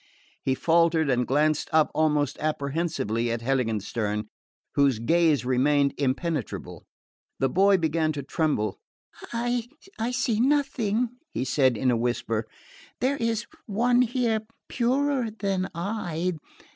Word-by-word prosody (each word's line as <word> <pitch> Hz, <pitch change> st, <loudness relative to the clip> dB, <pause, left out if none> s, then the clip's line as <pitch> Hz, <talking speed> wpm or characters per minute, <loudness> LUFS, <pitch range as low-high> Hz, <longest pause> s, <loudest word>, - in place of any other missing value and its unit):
He 130 Hz, -, 0 dB
faltered 165 Hz, -1 st, +3 dB
and 125 Hz, -1 st, +1 dB
glanced 150 Hz, +2 st, +1 dB
up 155 Hz, -1 st, +3 dB
almost 150 Hz, -3 st, +1 dB
apprehensively 140 Hz, -6 st, -1 dB
at 115 Hz, 0 st, -2 dB
Heiligenstern, 110 Hz, -4 st, -1 dB, 0.4 s
whose 140 Hz, -4 st, +3 dB
gaze 155 Hz, +3 st, +2 dB
remained 140 Hz, +2 st, +2 dB
impenetrable. 140 Hz, -, -3 dB, 0.5 s
The 135 Hz, -, +1 dB
boy 195 Hz, +5 st, +4 dB
began 160 Hz, -1 st, +1 dB
to 140 Hz, -2 st, -5 dB
tremble. 140 Hz, -, -1 dB, 0.5 s
"I 240 Hz, 0 st, -1 dB, 0.4 s
see 245 Hz, -3 st, 0 dB
nothing," 250 Hz, -4 st, +1 dB, 0.2 s
he 130 Hz, -, -3 dB
said 130 Hz, -2 st, +2 dB
in 125 Hz, +3 st, +2 dB
a -, -, +2 dB
whisper. 115 Hz, -2 st, -1 dB, 0.5 s
"There 270 Hz, +3 st, +1 dB
is 230 Hz, -2 st, -1 dB, 0.2 s
one 240 Hz, +4 st, +3 dB
here 240 Hz, -2 st, +1 dB, 0.3 s
purer 260 Hz, 0 st, +1 dB
than 195 Hz, -3 st, -2 dB
I... 180 Hz, -2 st, -2 dB
160 Hz, 120 wpm, -26 LUFS, 130-220 Hz, 0.5 s, boy